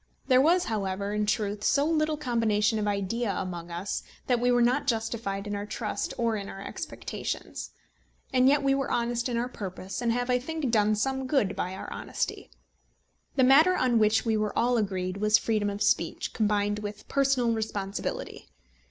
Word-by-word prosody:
There 255 0 +6
was, 345 +5 +4
however, 200 - -2
in 210 0 0
truth 205 -1 -1
so 280 +5 +3
little 310 -1 +1
combination 225 -5 +1
of 210 - -1
idea 205 +3 -1
among 175 -2 -5
us, 175 +4 -3 0.2
that 245 -2 +2
we 245 +1 +2
were 245 0 +4
not 255 +4 +2
justified 225 -4 -1
in 205 - -4
our 205 +1 -4
trust 210 0 -3
or 230 -2 +1
in 200 -2 -5
our 195 - -8
expectations. - - -5 0.6
And 255 0 +5
yet 285 +1 +4
we 275 0 +3
were 275 -1 -1
honest 235 +1 0
in 240 - -1
our 240 +1 0
purpose, 195 -3 -6
and 235 -1 +1
have, 245 +1 0
I 250 - +3
think, 295 -1 -3
done 215 -1 +3
some 265 +4 -1
good 255 -9 +1
by 185 +1 -3
our - - -7
honesty. - - -4 0.9
The 260 - +4
matter 310 +8 +6
on 245 -3 +3
which 220 +1 +3
we 225 -1 +2
were 215 -1 -1
all 245 +1 +3
agreed 190 -3 -1
was 210 +1 +4
freedom 215 -2 0
of 205 +1 -2
speech, 170 -5 0
combined 205 -1 +1
with 210 0 -7
personal 270 -4 +2
responsibility. 210 -3 -4
225 Hz, 185 wpm, -28 LUFS, 205-250 Hz, 0.9 s, There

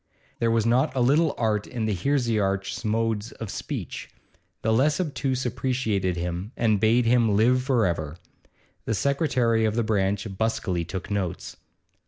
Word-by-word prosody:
There 115 - +2
was 115 -1 +2
not 130 +5 +2
a - - 0
little 145 +6 +3
art 105 -3 0
in 115 -3 -3
the 110 - 0
heresiarch's 105 -4 0
modes 110 0 -1
of 110 -4 -7
speech; - - -5 0.5
the 110 - +2
less 145 +8 +2
obtuse 135 -6 -1
appreciated 115 -7 -1
him 90 +6 -4
and 110 -3 +2
bade 115 +3 +3
him 115 -3 +3
live 125 +5 +4
for 125 -4 +2
ever. 80 -3 -2 0.7
The 110 - 0
secretary 125 - +1
of 110 -1 +1
the 120 - +1
branch 100 -1 0
busily 105 -6 0
took 95 +3 -6
notes. 95 -4 -3
115 Hz, 155 wpm, -25 LUFS, 100-125 Hz, 0.7 s, live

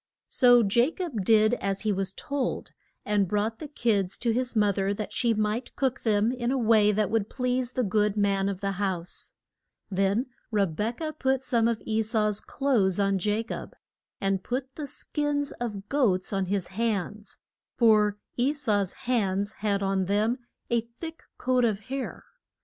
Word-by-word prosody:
So 245 -2 +6
Ja 235 +7 +4
cob 325 - -4
did 215 +2 +4
as 195 0 -1
he 215 -2 +1
was 195 -1 -1
told, 275 +5 -3 0.3
and 205 -2 +2
brought 210 +3 -1
the 305 - -6
kids 210 -9 0
to 235 - 0
his 250 +1 -1
mo 210 -2 +4
ther 195 +1 -1
that 210 0 -5
she 235 -2 +2
might 215 +3 -1
cook 265 -2 0
them 215 0 +2
in 245 -1 -2
a 270 - +1
way 220 -3 +4
that 210 -1 0
would 220 -2 0
please 250 -1 -1
the 255 - 0
good 210 0 +1
man 200 -1 +2
of 195 -2 -5
the 195 0 0
house. 180 -3 -3 0.6
Then 195 +5 +1 0.2
Re 210 -4 +2
bek 210 - -3
ah 310 -1 -1
put 265 -3 0
some 235 -3 +2
of 230 -3 -1
E 220 0 +1
sau's 215 -2 +1
clothes 220 -10 +1
on 195 -1 +2
Ja 210 +4 0
cob, 230 - -7 0.4
and 195 -1 0
put 260 +2 -3
the 295 0 -6
skins 290 +1 -1
of 205 -4 -4
goats 210 -10 +1
on 195 -1 0
his 195 -1 -1
hands, 210 0 -2 0.4
for 210 -3 +4 0.2
E 255 +4 +2
sau's 210 - 0
hands 205 -4 +1
had 200 -2 0
on 195 -1 +1
them 215 +6 +1 0.3
a 235 -1 +3
thick 280 +9 -9 0.2
coat 255 -1 +1
of 215 -4 +1
hair. 260 +5 -5
215 Hz, 180 wpm, -27 LUFS, 200-250 Hz, 0.6 s, So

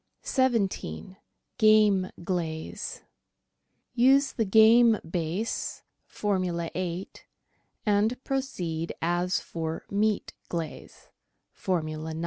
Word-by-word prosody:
17— 200 - -1 0.4
GAME 210 -3 +5 0.2
QLAZE 165 -4 -4 0.9
Use 270 +3 +4
the 225 - -1
game 220 +2 +6
base 175 +6 -3 0.2
(Formula 185 -5 -1
8), 180 0 -5 0.6
and 215 +5 +1
proceed 175 -12 -3
as 175 +2 +1
for 160 -1 -5
meat 210 +1 0 0.2
glaze 165 -3 -6 0.4
(Formula 155 -3 -3
9). - - -5
190 Hz, 85 wpm, -27 LUFS, 170-220 Hz, 0.9 s, game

